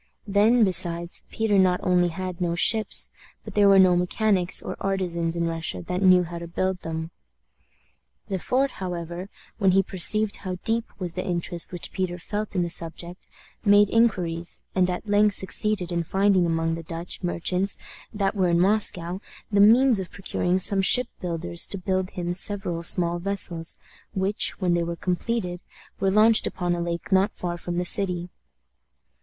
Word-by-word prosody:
Then, 215 Hz, +3 st, +3 dB
besides, 175 Hz, -3 st, +3 dB
Peter 215 Hz, -3 st, +1 dB
not 185 Hz, -1 st, +3 dB
only 180 Hz, -1 st, +2 dB
had 185 Hz, +1 st, -6 dB
no 170 Hz, -1 st, 0 dB
ships, 215 Hz, +4 st, +1 dB, 0.3 s
but -, -, -9 dB
there 205 Hz, -1 st, +4 dB
were 195 Hz, -, +6 dB
no 185 Hz, -2 st, +5 dB
mechanics 185 Hz, +1 st, +2 dB
or -, -, -6 dB
artisans 175 Hz, -4 st, -2 dB
in 170 Hz, 0 st, -1 dB
Russia 165 Hz, -, -2 dB
that 180 Hz, +1 st, -4 dB
knew 185 Hz, -2 st, +5 dB
how 170 Hz, 0 st, -7 dB
to 170 Hz, -, -8 dB
build 185 Hz, +2 st, -2 dB
them. 160 Hz, 0 st, -5 dB, 1.2 s
Le 190 Hz, -2 st, -3 dB
Fort, 265 Hz, +8 st, 0 dB
however, 175 Hz, -1 st, -6 dB, 0.3 s
when 190 Hz, -3 st, +3 dB
he 195 Hz, +1 st, +4 dB
perceived 200 Hz, +3 st, +1 dB
how 185 Hz, -2 st, -6 dB
deep 225 Hz, +1 st, -1 dB
was 180 Hz, -3 st, -5 dB
the 185 Hz, -, -4 dB
interest 175 Hz, -1 st, -3 dB
which 175 Hz, -2 st, -4 dB
Peter 180 Hz, -2 st, -3 dB
felt 205 Hz, +3 st, -5 dB
in 180 Hz, -, +1 dB
the 170 Hz, -, -3 dB
subject, 170 Hz, +2 st, -4 dB, 0.4 s
made 205 Hz, -1 st, +4 dB
inquiries, 175 Hz, -7 st, 0 dB
and 185 Hz, -1 st, +2 dB
at 180 Hz, +4 st, -5 dB
length 205 Hz, 0 st, +3 dB
succeeded 190 Hz, -1 st, +2 dB
in 170 Hz, -1 st, -1 dB
finding 190 Hz, 0 st, +2 dB
among 165 Hz, 0 st, -1 dB
the 165 Hz, -, -5 dB
Dutch 165 Hz, +2 st, -6 dB
merchants 180 Hz, +2 st, -1 dB, 0.3 s
that 200 Hz, -2 st, -1 dB
were 190 Hz, -4 st, +1 dB
in 170 Hz, 0 st, +2 dB
Moscow 185 Hz, -2 st, +1 dB, 0.3 s
the 200 Hz, -1 st, +3 dB
means 235 Hz, +2 st, +5 dB
of 185 Hz, -, -6 dB
procuring 185 Hz, -2 st, -2 dB
some 195 Hz, +1 st, +6 dB
ship 250 Hz, +5 st, +4 dB
builders 175 Hz, 0 st, -2 dB
to 200 Hz, -, -3 dB
build 185 Hz, 0 st, -2 dB
him 175 Hz, -1 st, -4 dB
several 190 Hz, -2 st, -3 dB
small 170 Hz, 0 st, +1 dB
vessels, 175 Hz, -3 st, -1 dB, 0.4 s
which, 195 Hz, +2 st, 0 dB
when 180 Hz, -3 st, +1 dB
they 170 Hz, 0 st, +1 dB
were 170 Hz, 0 st, -4 dB
completed, 180 Hz, 0 st, -3 dB, 0.4 s
were 195 Hz, -, +1 dB
launched 215 Hz, +3 st, +4 dB
upon 175 Hz, -1 st, -2 dB
a 175 Hz, -, -3 dB
lake 170 Hz, +2 st, -5 dB
not 190 Hz, +2 st, +3 dB
far 175 Hz, -1 st, -4 dB
from 175 Hz, 0 st, -5 dB
the 180 Hz, -, -1 dB
city. 180 Hz, -1 st, +1 dB
180 Hz, 170 wpm, -24 LUFS, 175-200 Hz, 1.2 s, were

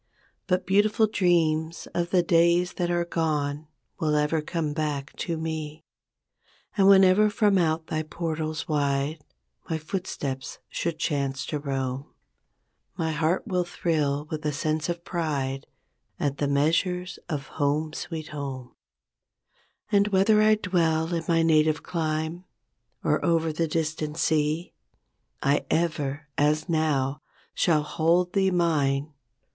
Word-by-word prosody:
But 180 Hz, -1 st, +1 dB
beautiful 210 Hz, +3 st, +3 dB
dreams 170 Hz, -5 st, +1 dB
of 175 Hz, 0 st, -1 dB
the 180 Hz, -1 st, +3 dB
days 170 Hz, +1 st, +3 dB
that 175 Hz, -1 st, -1 dB
are 175 Hz, 0 st, +1 dB
gone 150 Hz, -3 st, -1 dB, 0.3 s
Will 155 Hz, -2 st, +1 dB
ever 150 Hz, +1 st, +1 dB
come 155 Hz, -1 st, -2 dB
back 145 Hz, -2 st, -3 dB
to 170 Hz, -2 st, -2 dB
me; 160 Hz, -1 st, -5 dB, 0.9 s
And 195 Hz, -2 st, +4 dB
whenever 195 Hz, +2 st, +6 dB
from 205 Hz, -2 st, +3 dB
out 160 Hz, -1 st, +1 dB
thy 155 Hz, -1 st, -2 dB
portals 155 Hz, -1 st, -3 dB
wide 145 Hz, 0 st, 0 dB, 0.5 s
My 160 Hz, -, 0 dB
footsteps 150 Hz, -5 st, -4 dB
chance 145 Hz, -5 st, -2 dB
to 150 Hz, -, -3 dB
roam 135 Hz, -1 st, -3 dB, 0.9 s
20 -, -, -35 dB
My 160 Hz, -1 st, 0 dB
heart 160 Hz, +3 st, 0 dB
will 180 Hz, -2 st, 0 dB
thrill 150 Hz, -4 st, -1 dB
with 155 Hz, 0 st, -4 dB
a 150 Hz, -, 0 dB
sense 155 Hz, +3 st, -1 dB
of 170 Hz, 0 st, -4 dB
pride 140 Hz, -7 st, -2 dB, 0.5 s
At 140 Hz, -1 st, -1 dB
the 145 Hz, -, +1 dB
measures 170 Hz, +6 st, 0 dB
of 145 Hz, -4 st, -3 dB
"Home 150 Hz, +2 st, +1 dB
Sweet 155 Hz, -1 st, -5 dB
Home''. 135 Hz, -4 st, -6 dB, 1.2 s
And 200 Hz, -1 st, +4 dB
whether 210 Hz, +2 st, +4 dB
I 215 Hz, 0 st, +5 dB
dwell 170 Hz, -4 st, 0 dB
in 165 Hz, -1 st, -2 dB
my 165 Hz, -1 st, +3 dB
native 155 Hz, -1 st, +3 dB
clime, 160 Hz, +1 st, -2 dB, 0.6 s
Or -, -, +1 dB
over 165 Hz, -1 st, +2 dB
the 165 Hz, +1 st, 0 dB
distant 155 Hz, -1 st, -2 dB
sea, 155 Hz, +1 st, 0 dB, 0.7 s
I 140 Hz, +1 st, +2 dB
ever, 150 Hz, -3 st, -1 dB
as 150 Hz, +2 st, +2 dB
now, 150 Hz, -4 st, 0 dB, 0.3 s
shall 155 Hz, -3 st, +2 dB
hold 170 Hz, +4 st, +1 dB
thee 195 Hz, -1 st, +3 dB
mine. 150 Hz, -5 st, +1 dB
160 Hz, 130 wpm, -26 LUFS, 150-175 Hz, 1.2 s, whenever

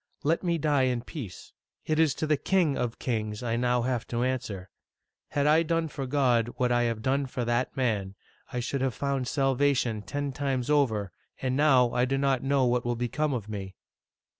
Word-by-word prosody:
Let 160 Hz, +3 st, +2 dB
me 170 Hz, -2 st, 0 dB
die 145 Hz, -3 st, +2 dB
in 120 Hz, -2 st, -2 dB
peace. 125 Hz, -, -8 dB, 0.3 s
It 155 Hz, 0 st, 0 dB
is 155 Hz, -5 st, +3 dB
to -, -, -2 dB
the 155 Hz, 0 st, +3 dB
King 165 Hz, -1 st, +1 dB
of 120 Hz, -2 st, -2 dB
Kings 110 Hz, -3 st, -3 dB
I 115 Hz, -1 st, 0 dB
now 120 Hz, 0 st, +1 dB
have 125 Hz, -2 st, -1 dB
to 120 Hz, 0 st, -1 dB
answer. 115 Hz, -8 st, -3 dB, 0.6 s
Had 145 Hz, -1 st, 0 dB
I 155 Hz, +2 st, +5 dB
done 165 Hz, 0 st, 0 dB
for 135 Hz, -2 st, -5 dB
God 125 Hz, -4 st, +2 dB
what 125 Hz, -1 st, +1 dB
I 120 Hz, 0 st, +3 dB
have 110 Hz, -1 st, -4 dB
done 135 Hz, +1 st, +1 dB
for 125 Hz, -1 st, -3 dB
that 120 Hz, +3 st, -1 dB
man, 105 Hz, -7 st, -1 dB, 0.4 s
I 125 Hz, -, -2 dB
should 130 Hz, +3 st, -2 dB
have 130 Hz, -3 st, 0 dB
found 140 Hz, -3 st, -1 dB
salvation 135 Hz, -5 st, +1 dB
ten 140 Hz, +8 st, -3 dB
times 135 Hz, -1 st, -1 dB
over, 110 Hz, -10 st, +2 dB, 0.3 s
and 130 Hz, -1 st, -1 dB
now 130 Hz, -4 st, +4 dB
I 125 Hz, 0 st, +2 dB
do 135 Hz, +1 st, 0 dB
not 135 Hz, -2 st, +1 dB
know 135 Hz, -1 st, +2 dB
what 125 Hz, 0 st, +1 dB
will 120 Hz, 0 st, -1 dB
become 130 Hz, +6 st, -1 dB
of 110 Hz, -4 st, -4 dB
me 95 Hz, -3 st, -6 dB
130 Hz, 200 wpm, -28 LUFS, 120-140 Hz, 0.6 s, I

